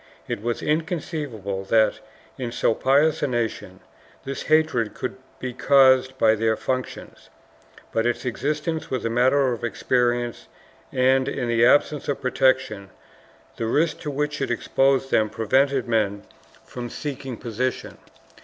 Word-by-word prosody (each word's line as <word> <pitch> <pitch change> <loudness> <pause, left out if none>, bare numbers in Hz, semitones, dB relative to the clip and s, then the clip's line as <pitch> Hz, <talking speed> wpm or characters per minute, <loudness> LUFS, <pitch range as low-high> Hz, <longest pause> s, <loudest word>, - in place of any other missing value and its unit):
It - - -4
was 120 +1 -3
inconceivable 150 - -3
that, 110 +1 +2 0.4
in 125 -2 -5
so 115 - +1
pious 145 +6 +2
a 145 - +1
nation, 120 -3 -3 0.4
this 135 0 -4
hatred 155 -8 +1
could 130 - -4 0.2
be 130 -1 -5
caused 130 0 +4
by 110 -3 +4
their 110 0 +1
functions, 130 -1 -5 0.6
but 115 +1 +1
its 120 +2 -2
existence 150 +6 -2
was 130 -3 -3
a 115 - 0
matter 130 +2 +3
of 120 - -7
experience 120 - 0 0.4
and, 130 0 +2
in 125 -3 -2
the 115 0 +4
absence 145 +2 +2
of 140 - -1
protection, 130 -6 +1 0.7
the 115 - -2
risks 155 +8 +1
to 150 - -4
which 145 +1 -2
it 135 - -1
exposed 135 +3 +1
them 110 -1 +3
prevented 130 +4 +1
men 105 -3 0 0.4
from 120 -1 -7
seeking 135 -2 -6
the - - -17
posi 125 +3 0
tion. - - -11
130 Hz, 145 wpm, -23 LUFS, 115-140 Hz, 0.7 s, caused